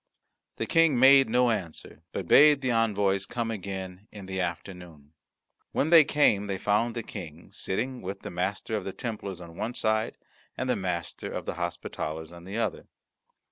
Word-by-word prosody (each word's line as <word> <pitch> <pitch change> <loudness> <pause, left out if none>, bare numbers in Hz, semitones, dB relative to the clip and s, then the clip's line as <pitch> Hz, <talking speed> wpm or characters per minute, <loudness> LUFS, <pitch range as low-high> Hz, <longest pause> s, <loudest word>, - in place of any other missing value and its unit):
The - - -2
King 165 -5 +4
made 135 0 +7
no 125 +1 +3
answer, 85 -6 -5
but 95 - -5
bade 145 - +7
the 130 -2 0
envoys 100 -4 +1
come 120 -1 -3
again 95 -1 -6
in 100 -3 -10
the 95 0 -4
afternoon. 85 -4 -6 0.6
When 155 - +1
they 165 -2 +9
came 110 -9 +2
they 95 -1 -2
found 105 +4 +1
the 115 - -3
King 85 -5 -9
sitting 125 +6 -3
with 95 +1 -6
the - - -7
Master 95 +5 -2
of 105 - -2
the 95 - -5
Templars 105 -6 -5
on 85 -1 -11
one 115 +6 -4
side 110 0 0 0.4
and 130 - -2
the 125 - +2
Master 90 -4 -4
of - - -5
the - - -3
Hospitallers 80 -2 -4
on 85 0 -12
the 100 +4 -5
other. 115 - -2
100 Hz, 180 wpm, -27 LUFS, 90-120 Hz, 0.6 s, they